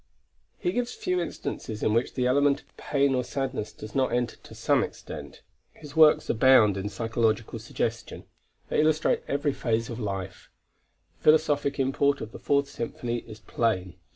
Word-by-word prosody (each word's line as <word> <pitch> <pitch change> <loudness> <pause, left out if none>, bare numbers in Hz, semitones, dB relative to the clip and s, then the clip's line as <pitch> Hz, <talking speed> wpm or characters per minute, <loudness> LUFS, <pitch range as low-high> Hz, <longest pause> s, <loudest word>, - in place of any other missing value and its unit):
He 360 - -1
gives 245 -6 -2
few 180 -1 -1
instances 110 -9 -5
in 105 - +2
which 115 +2 0
the 125 - 0
element 140 +2 +3
of - - -32
pain 140 -1 +1
or 125 -1 +1
sadness 130 -5 -3
does 110 0 -10
not 130 -1 +1
enter 120 -1 0
to - - -14
some - - +2
extent. - - -8 0.3
His 150 -2 -12
works 155 -1 +6
abound 115 -4 +5
in 100 +1 -3
psychological 115 +1 -1
suggestion; - - -4 0.5
they - - +2
illustrate 155 0 +2
every 145 0 0
phase 115 -2 -1
of 115 - -6
life. 95 -4 -5 0.7
The - - -22
philosophic 150 -2 +3
import 140 +1 +2
of 110 - -7
the - - -10
Fourth 140 -1 +1
Symphony 120 -1 -4
is 110 -1 -11
plain. 95 -8 -1
125 Hz, 165 wpm, -27 LUFS, 110-140 Hz, 0.7 s, works